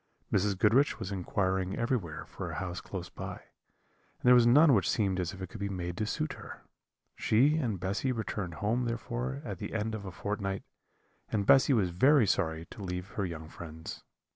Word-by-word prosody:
Mrs. 100 0 +2
Goodriche 115 +9 +4
was 95 - -5
inquiring 95 0 -1
everywhere 115 - -2
for - - -6
a - - -5
house 90 -1 -4
close 90 -3 -6
by, - - -6
and - - -21
there 125 - +7
was 120 -1 +6
none 145 +4 +7
which 100 -7 +3
seemed 95 -4 +1
as 90 -1 -1
if 95 -1 -8
it 95 - -6
could 110 - -9
be 100 0 -2
made 90 -2 -4
to 105 - -1
suit 80 - -2
her. - - -10 0.5
She 135 +8 +3
and 115 - -1
Bessy 100 +8 -1
returned 105 -7 -3
home 115 +6 0
therefore 65 - -3
at - - -5
the - - -5
end 110 0 -1
of 110 -2 -4
a 95 - -5
fortnight, 100 0 -3 0.7
and 100 -2 0
Bessy 135 +4 +6
was 100 -7 +2
very 130 - +5
sorry 80 -4 0
to - - -9
leave 90 0 -4
her 100 - -2
young 80 -2 -7
friends. 80 0 -8
100 Hz, 195 wpm, -31 LUFS, 90-115 Hz, 0.7 s, there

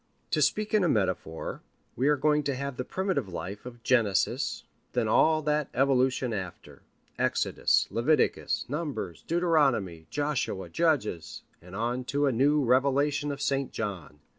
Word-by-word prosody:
To - - +1
speak 215 0 +1
in 210 -3 +4
a 175 - +2
metaphor, 95 - -2 0.3
we 130 +4 +1
are 150 0 +4
going 150 +2 +2
to 140 - 0
have 140 0 -4
the 125 - -2
primitive 185 - -2
life 95 +6 -6
of 120 -1 -11
Genesis, 120 +2 +1 0.3
then 120 -3 +1
all 155 +8 +3
that 150 -1 0
evolution 130 -2 +2
after: 95 -4 -7 0.4
Exodus, - - +2
Leviticus, 145 +7 +1
Numbers, 140 - -4
Deuteronomy, 140 - +1
Joshua, 145 -9 -2
Judges, 110 - -1 0.2
and 90 +2 -11
on 120 +4 -1
to 145 +2 0
a 135 - +3
new 140 +5 +3
revelation 140 +3 +2
of 140 0 -5
St. 135 -1 0
John. 95 -9 -5
130 Hz, 145 wpm, -28 LUFS, 105-150 Hz, 0.4 s, in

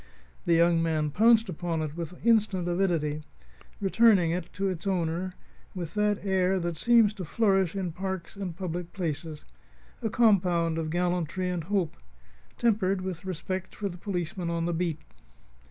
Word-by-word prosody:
The 170 - +4
young 170 0 +4
man 155 -2 0
pounced 225 +4 +5
upon 170 -2 -2
it 155 -1 -5
with 170 0 -5
instant 210 -6 +3
avidity, 170 -5 0 0.6
returning 200 -3 +4
it 175 0 -3
to 195 +1 -1
its 185 0 -3
owner 180 0 -1 0.4
with 170 -3 -5
that 210 -1 0
air 190 -1 +2
that 170 -1 -2
seems 230 +3 +4
to 200 -3 -6
flourish 195 -1 +1
in 185 -3 -2
parks 190 0 -5
and 185 -4 -5
public 175 -2 -4
places 160 -3 -4 0.6
a 225 - -1
compound 180 -8 +3
of 160 -1 -2
gallantry 180 +1 -1
and 170 -3 -3
hope, 190 -4 -1 0.6
tempered 200 -5 +1
with 185 0 -5
respect 185 +1 -4
for 205 -2 -3
the 175 - -8
policeman 175 -2 -3
on 170 0 -1
the 175 - 0
beat. 165 -2 -1
180 Hz, 155 wpm, -28 LUFS, 165-195 Hz, 0.6 s, pounced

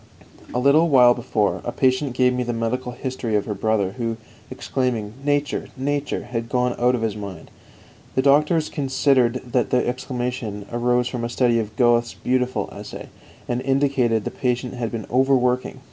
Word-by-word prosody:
3. - - -11
A - - +2
little 140 +6 +4
while 125 -4 +7
before, 110 -4 -1
a - - -3
patient 130 0 +1
gave 125 0 +3
me 125 - -1
the 120 -1 -2
medical 125 +2 -2
history 125 -3 -3
of 105 - +1
her 105 - -3
brother, 105 -2 0
who, 115 -1 -2 0.3
exclaiming 120 -6 -2
"Nature, 145 0 0
Nature!" 145 +2 -2
had 115 -1 -4
gone 125 -1 +1
out 125 +1 +3
of 115 - -3
his 110 -2 -1
mind. 100 -6 -8 0.6
The 130 - +2
doctors 150 +3 +3
considered 130 -3 +2
that 125 -1 0
the 125 - +1
exclamation 125 -4 -3
arose 120 +1 +1
from 125 -1 -4
a 120 - -2
study 120 -1 +2
of 105 -1 -4
Goethe's 120 0 +2
beautiful 125 0 -1
essay, - - -9 0.4
and 120 0 -1
indicated 135 -4 +1
that - - -4
the - - -20
patient 125 -1 -1
had 120 -3 -3
been 115 -2 -4
overworking. 125 0 +2
125 Hz, 175 wpm, -22 LUFS, 115-130 Hz, 0.6 s, while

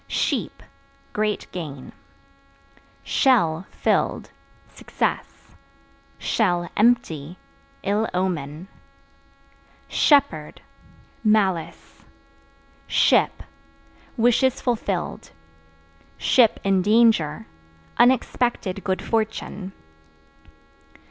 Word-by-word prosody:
Sheep - - -2 0.5
Great 210 0 -1
gain. 145 -7 -7 1.1
Shell 180 - +2
(Filled) - - -1 0.4
success; - - -4 1.2
(empty) 180 -8 +1 0.5
ill 210 +3 0
omen. 175 -3 -3 1.2
Shepherd 275 - +2 0.6
Malice. 195 -6 0 0.8
Ship - - +2 0.7
Wishes 245 +3 +2
fulfilled; 240 -3 -3 1.3
(in 195 -1 +2
danger) 205 - +3 0.5
unexpected 240 -5 +1
good 190 -1 -2
fortune. 215 -3 -3
200 Hz, 55 wpm, -23 LUFS, 170-230 Hz, 1.3 s, danger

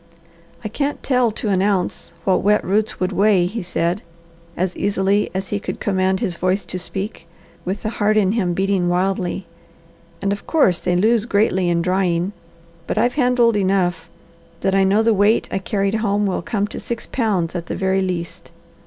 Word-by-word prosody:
"I - - -2
can't 280 +7 -3
tell 250 -3 +2
to 215 0 -4
an 190 -2 +2
ounce 195 -4 0
what 190 - +3
wet 210 +1 +2
roots 210 +3 0
would 185 +1 0
weigh," 195 -1 +3
he 210 +6 -3
said 175 +1 -1 0.6
as 185 0 -1
easily 200 +1 +1
as 190 0 -3
he 205 - -1
could - - -5
command 190 -1 +1
his 175 -3 -2
voice 185 +3 0
to 185 - -5
speak 190 -2 -6 0.4
with 190 +3 -3
the 215 - -1
heart 215 +1 +3
in 195 -3 +3
him 185 -6 0
beating 190 -2 +1
wildly, 185 0 -1 0.7
"and 200 0 0
of 205 - -8
course 195 - +3
they 180 -1 0
lose 220 +4 +2
greatly 190 -4 +2
in 170 -1 +1
drying; 180 0 +1 0.6
but - - -2
I've 245 - +2
handled 245 -4 +3
enough 185 -4 0 0.5
that 195 - +1
I 195 0 +4
know 200 +3 +3
the 225 0 +4
weight 205 +3 +3
I 195 - -1
carried 200 0 -1
home 210 -2 +1
will 190 - -1
come 220 -4 -1
to - - -6
six 235 -1 -5
pounds 200 -9 -1
at 170 -2 -5
the - - -3
very 190 0 +1
least. 180 -2 -4
195 Hz, 190 wpm, -20 LUFS, 185-210 Hz, 0.7 s, I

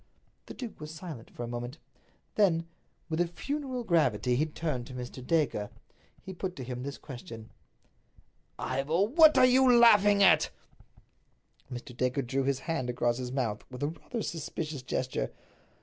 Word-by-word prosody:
The - - -8
duke 245 -4 -7
was 150 - -6
silent 160 -8 -8
for 120 - -7
a - - -4
moment. 120 +4 -5 0.6
Then 170 -6 +3 0.4
with 170 +1 -1
funereal 275 -3 -3
gravity 125 - +2
he 150 +5 +1
turned 150 -6 -3
to 130 - -9
Mr. 125 0 -7
Dacre. 140 -8 0 0.5
He 190 - -7
put 185 0 -4
to 130 - -6
him 125 0 -5
this 140 +2 -5
question: 115 -4 -10 1.1
"Ivor, 140 +8 0
what 310 +7 +6
are - - +8
you 255 0 +5
laughing 205 -3 +6
at?" 160 -5 +5 1.2
Mr. 125 0 -7
Dacre 125 +2 0
drew 130 +2 -1
his 135 -1 0
hand 135 -7 -2
across 120 0 0
his 125 -1 -4
mouth 120 -6 -2
with 125 +2 -7
rather 165 +10 -4
a 220 - -1
suspicious 155 -2 -4
gesture. 125 - -2
145 Hz, 155 wpm, -30 LUFS, 125-185 Hz, 1.2 s, are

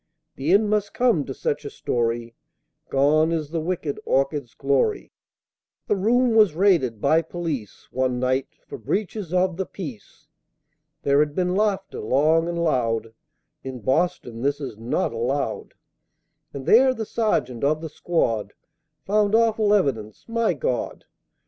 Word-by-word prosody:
The 140 +5 -1
end 205 +3 +5
must 210 -1 -1
come 235 - +2
to 135 - -5
such - - -2
a 140 - -5
story, 115 -2 -2 0.6
Gone 150 +4 +3
is 155 -3 -2
the 165 -1 -1
wicked 165 -4 -3
Orchids' 135 -2 -1
glory; 140 - 0 0.7
The - - +1
room 235 +5 +2
was 210 -8 +5
raided 165 - +2
by 155 +7 +3
police, 160 - -5
One 130 -1 0
night, 130 +1 0 0.2
for - - -8
breaches 205 -3 -3
of 180 -1 +1
the 190 - -1
Peace 140 - -9 0.8
(There 140 0 +3
had 150 0 +1
been 180 -1 0
laughter, 195 -1 -1
long 155 +8 +2
and 170 0 -3
loud, 115 -7 0 0.5
In 130 -2 -7
Boston 130 - -1
this 140 +2 0
is 130 -6 -6
not 115 +2 -2
allowed), 130 +5 -2 0.8
And 135 -2 -7
there, 260 +3 +5
the 220 - -4
sergeant 135 - -1
of 150 +2 +2
the 160 - -5
squad 115 -11 -1 0.5
Found 210 +1 +2
awful 225 -2 +3
evidence 125 - 0
my 230 -5 0
God! 125 -2 -3
155 Hz, 145 wpm, -23 LUFS, 130-195 Hz, 0.8 s, end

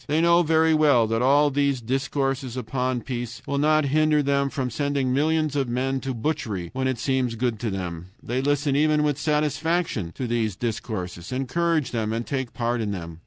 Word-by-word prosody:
They 150 +2 +1
know 170 +1 +5
very 160 0 +3
well 145 -7 +4
that 115 +1 -1
all 145 +3 +4
these 140 -1 +1
discourses 135 +1 -2
upon 125 +1 -2
peace 120 -2 -5
will 140 0 -1
not 155 0 +3
hinder 155 -1 +3
them 140 0 +1
from 135 -4 -3
sending 140 -1 0
millions 155 +1 +1
of 135 -3 0
men 130 +2 -1
to 130 -1 -4
butchery 110 - -3
when 130 0 -1
it 130 -2 -1
seems 130 -1 0
good 115 -2 -1
to 115 - -2
them. 90 -3 -5 0.2
They 125 +2 -1
listen 145 0 +1
even 150 +1 +3
with 150 -1 0
satisfaction 150 - 0
to 130 - -4
these 115 -4 -1
discourses, 95 -5 -4
encourage 155 +4 0
them, 110 -2 -1
and 115 +1 -2
take 130 -3 -3
part 120 0 -1
in 105 - -2
them. 85 -4 -6
130 Hz, 190 wpm, -24 LUFS, 115-150 Hz, 0.2 s, know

